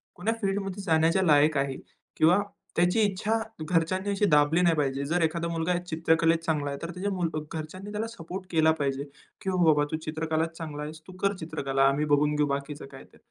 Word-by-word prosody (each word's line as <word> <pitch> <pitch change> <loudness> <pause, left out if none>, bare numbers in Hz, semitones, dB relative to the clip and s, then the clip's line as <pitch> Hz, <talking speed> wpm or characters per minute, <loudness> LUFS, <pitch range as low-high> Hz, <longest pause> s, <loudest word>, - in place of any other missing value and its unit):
कोण्या 215 +6 -1
फील्डमध्ये 195 -1 -2
जाण्याच्या 165 0 +3
लायक 150 -2 +4
आहे 135 -1 0 0.4
किंवा 165 +4 +5 0.4
त्याची 175 +6 +3
इच्छा 210 +2 +1 0.3
घरच्यांनी 180 +3 +1
अशी 200 +1 +1
दाबली 150 +3 +4
नाही 170 -2 +4
पाहिजे. 140 -2 0
जर 170 +5 0
एखादा 165 +1 0
मुलगा 165 +1 0
चित्रकलेत 165 -1 +2
चांगला 150 -3 0
आहे. 140 - -4
तर 165 - -5
त्याच्या 185 +4 -3 0.5
घरच्यांनी 185 +6 -8
त्याला 215 +2 -2
सपोर्ट 190 -4 -7
केला 160 -1 +4
पाहिजे, 140 -1 -1 0.4
की 190 - -2 0.2
बाबा 150 -2 +5
तू 155 - 0
चित्रकलात 160 +1 -1
चांगला 150 -3 -5
आहेस 155 +1 -7
तू 185 - -10
कर 200 0 +2
चित्रकला. 140 -5 -1
आम्ही 140 +2 +1
बघून 150 0 +2
घेऊ 150 0 +2
बाकीचं 140 +1 -4
काय 135 - -11
ते. - - -22
160 Hz, 185 wpm, -27 LUFS, 150-180 Hz, 0.5 s, किंवा